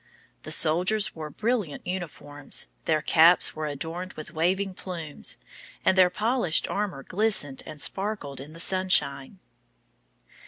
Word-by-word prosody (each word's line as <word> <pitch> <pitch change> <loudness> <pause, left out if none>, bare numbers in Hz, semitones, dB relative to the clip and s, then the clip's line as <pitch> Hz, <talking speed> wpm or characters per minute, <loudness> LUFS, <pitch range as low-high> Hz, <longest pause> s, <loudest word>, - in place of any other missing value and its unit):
The 155 - -6
soldiers 175 +7 +2
wore 155 -2 -7
brilliant 215 - -2
uniforms, 150 -5 -2 0.2
their 155 -2 +1
caps 170 +2 +5
were 155 -1 -3
adorned 165 +6 -5
with 155 - -9
waving 185 +4 0
plumes, 170 -5 -5 0.5
and - - +4
their 185 -1 +6
polished 215 -4 +1
armor 200 -9 -3
glistened 185 -9 0
and 155 -1 -9
sparkled 190 -7 -1
in 145 +3 -10
the 165 - -11
sunshine. 185 -5 +2
170 Hz, 125 wpm, -26 LUFS, 150-190 Hz, 0.5 s, their